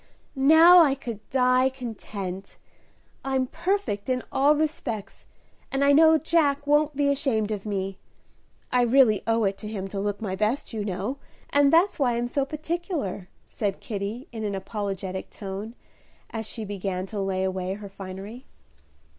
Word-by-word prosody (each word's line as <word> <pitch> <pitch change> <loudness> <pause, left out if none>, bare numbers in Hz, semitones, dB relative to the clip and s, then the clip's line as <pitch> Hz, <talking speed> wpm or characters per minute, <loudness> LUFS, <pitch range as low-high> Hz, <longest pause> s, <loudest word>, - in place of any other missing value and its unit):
"Now 320 +6 +8
I 290 -5 +5
could 235 -6 -6
die 255 0 +3
content; 205 -7 -7 0.7
I'm 265 -1 0
perfect 340 - -2
in 255 -1 0
all 285 +3 +4
respects, 280 -9 -3 0.4
and 270 +1 +1
I 285 - +5
know 320 +2 +7
Jack 300 -3 +1
won't 295 0 +2
be 285 0 +2
ashamed 230 -7 0
of 210 0 -4
me. 195 -2 -3 0.7
I 250 - +3
really 240 -3 +4
owe 225 0 +2
it 195 -1 0
to 215 - -7
him 200 -3 -4
to 195 - -4
look 205 0 -2
my 195 -4 -3
best, 215 +7 -1
you 215 -2 -2
know, 205 +7 -3 0.3
and 285 -1 +4
that's 340 +3 +3
why 245 -4 +2
I'm 240 0 -1
so 275 +2 0
particular," 305 - -4 0.2
said 200 -3 -3
Kitty, 215 - -5
in 225 -2 -6
an 205 -2 -2
apologetic 190 -1 -4
tone, 200 +3 -7 0.6
as 220 -1 -4
she 220 -1 -6
began 195 -2 -3
to 205 0 -4
lay 190 -1 -1
away 190 0 -2
her 205 0 -9
finery. 195 +5 -9
225 Hz, 160 wpm, -26 LUFS, 200-280 Hz, 0.7 s, Now